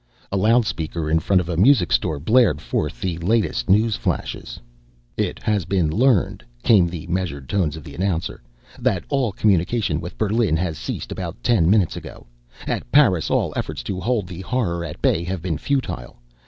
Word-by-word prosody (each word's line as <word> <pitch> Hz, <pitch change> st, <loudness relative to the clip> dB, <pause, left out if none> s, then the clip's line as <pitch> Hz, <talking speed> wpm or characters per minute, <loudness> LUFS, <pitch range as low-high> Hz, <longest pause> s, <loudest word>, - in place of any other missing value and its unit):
A -, -, -1 dB
loudspeaker 95 Hz, -7 st, +1 dB
in 80 Hz, -, +4 dB
front 90 Hz, +3 st, +2 dB
of 85 Hz, -, -7 dB
a 85 Hz, -, -2 dB
music 100 Hz, -, +4 dB
store 80 Hz, -4 st, +1 dB
blared 100 Hz, -, +3 dB
forth 75 Hz, +1 st, -3 dB
the 90 Hz, -4 st, -2 dB
latest 90 Hz, -, 0 dB
news 105 Hz, +3 st, +4 dB
flashes. -, -, -3 dB, 0.6 s
"It -, -, -1 dB
has 105 Hz, -3 st, +1 dB
been 90 Hz, -3 st, +1 dB
learned," 120 Hz, +1 st, +2 dB, 0.2 s
came 100 Hz, -7 st, +5 dB
the 85 Hz, -2 st, -6 dB
measured 85 Hz, -7 st, -3 dB
tones 85 Hz, -5 st, 0 dB
of 80 Hz, -, -9 dB
the 70 Hz, -, -10 dB
announcer, 90 Hz, 0 st, -2 dB, 0.4 s
"that -, -, 0 dB
all 135 Hz, -6 st, +1 dB
communication 95 Hz, -3 st, +1 dB
with 85 Hz, -, -8 dB
Berlin 110 Hz, -5 st, +1 dB, 0.2 s
ceased -, -, -5 dB
about -, -, -5 dB
ten 90 Hz, -9 st, +3 dB
minutes 100 Hz, -4 st, +3 dB
ago. -, -, -9 dB, 0.4 s
At -, -, -3 dB
Paris 105 Hz, -, +4 dB
all -, -, +1 dB
efforts 75 Hz, -2 st, -4 dB
to 95 Hz, -3 st, -4 dB
hold 115 Hz, -1 st, 0 dB
the 90 Hz, 0 st, -8 dB
Horror 90 Hz, -5 st, -1 dB
at 80 Hz, -3 st, -8 dB
bay 85 Hz, -, +2 dB
have 90 Hz, -2 st, -4 dB
been 80 Hz, -4 st, -2 dB
futile. 130 Hz, -, -3 dB
90 Hz, 175 wpm, -22 LUFS, 80-110 Hz, 0.6 s, came